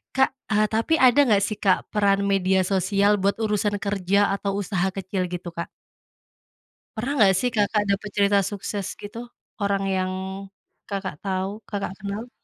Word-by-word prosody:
Kak, 265 0 +4 0.2
eee, 215 0 +4
tapi 225 +8 +1
ada 250 +2 +5
nggak 205 -4 +4
sih, 215 - -4
Kak, 190 -3 +5
peran 200 -1 +3
media 190 -1 +2
sosial 200 +2 +2
buat 200 +1 +2
urusan 210 -1 0
kerja 200 -1 0 0.2
atau 200 0 -2
usaha 190 -1 0
kecil 190 0 -2
gitu, 175 0 -5
Kak? 170 - -3 1.3
Pernah 245 +6 -2
nggak 195 -2 +6
sih 250 - +1
Kakak 210 0 +2
dapet 200 +1 -1
cerita 200 0 +4
sukses 200 0 -4 0.2
gitu? 210 +3 -7 0.4
Orang 200 -1 +1
yang, 185 0 -1 0.8
Kakak 195 -5 -3
tahu 195 +2 -3
Kakak 200 -3 -3
kenal? 205 +4 -5
200 Hz, 155 wpm, -24 LUFS, 190-210 Hz, 1.3 s, nggak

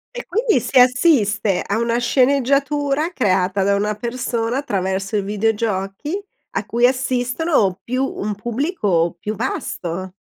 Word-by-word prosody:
E - - -6
quindi 435 - +1
si 255 +3 +2
assiste 245 - +3
a 200 - -1
una 235 0 0
sceneggiatura 280 +4 +1
creata 190 - +1
da 200 +1 +2
una 210 +1 0
persona 235 +1 -2
attraverso 195 -5 -2
i - - +1
videogiochi, 210 - -1 0.4
a - - -2
cui 240 +1 +3
assistono 250 - 0
più 255 +4 -1
un 210 -5 -3
pubblico 210 - -1
più 210 +4 -4
vasto. 185 -1 -4
230 Hz, 130 wpm, -20 LUFS, 200-270 Hz, 0.4 s, assiste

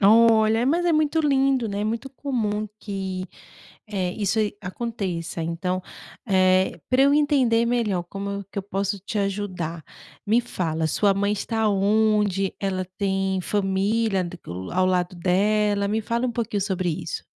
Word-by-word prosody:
Olha, 220 +1 +5
é, - - +1
mas 335 +6 +2
é 340 - +3
muito 310 +1 +2
lindo, 270 -5 +2
né, 200 +1 -2
muito 230 +5 -2
comum 220 -6 -2
que, 190 -2 -4 0.6
eh, 185 -4 -2
isso 210 +1 0
e 205 -1 -1
aconteça. 185 -5 -4
Então, 180 +3 -2 0.4
eh, 185 -1 +3
pra 260 +1 +5
eu 280 +1 +5
entender 265 -6 +3
melhor, 215 -7 0
como 200 +2 -5
que - - -3
eu 195 - -2
posso 200 +1 -2
te 205 +3 -4
ajudar, 185 -5 -3 0.4
me 225 +3 +4
fala, 165 -8 -2
sua 200 +5 +2
mãe 200 +1 +1
está 220 +1 0
onde? 205 -1 +2
Ela 190 -2 -1
tem 195 -1 0
família, 195 +2 +1
do 175 0 -7
que - - -18 0.2
ao 185 +1 +2
lado 180 -1 0
dela? 200 +3 +2
Me 220 +2 0
fala 235 +3 -1
um 240 - -2
pouquinho 225 -3 -2
sobre 185 -3 -1
isso. - - -5
205 Hz, 160 wpm, -24 LUFS, 185-225 Hz, 0.6 s, Olha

